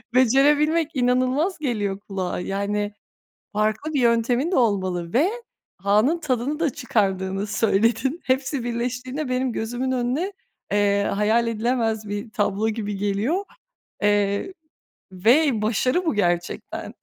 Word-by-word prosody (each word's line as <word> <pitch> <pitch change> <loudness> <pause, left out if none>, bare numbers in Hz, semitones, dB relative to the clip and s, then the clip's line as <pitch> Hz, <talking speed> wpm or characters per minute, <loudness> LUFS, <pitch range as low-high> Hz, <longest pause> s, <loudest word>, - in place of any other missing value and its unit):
becerebilmek 295 +5 +4
inanılmaz 255 +8 +1
geliyor 205 -8 -2
kulağa. 190 -4 -4
Yani, 205 +2 -2 0.6
farklı 215 +8 -1
bir 275 - +2
yöntemin 240 +5 +2
de - - +2
olmalı 185 -7 0
ve 300 +10 +3 0.5
anın 210 - +2
tadını 285 +1 -1
da 315 -4 +2
çıkardığını 195 -5 -1
söyledin. 225 - +1
Hepsi 260 0 0
birleştiğinde 250 +4 -3
benim 255 -1 0
gözümün 245 +4 -2
önüne, 260 +11 -1 0.4
eee, 200 0 +3
hayal 220 +3 +2
edilemez 225 -2 -1
bir 205 +2 -4
tablo 210 -1 0
gibi 210 -2 -3
geliyor, 205 - 0 0.6
eee, 205 - +1 0.6
ve 235 - +3
başarı 255 - +1
bu 320 - +1
gerçekten. 175 -3 -2
230 Hz, 115 wpm, -23 LUFS, 205-260 Hz, 0.6 s, becerebilmek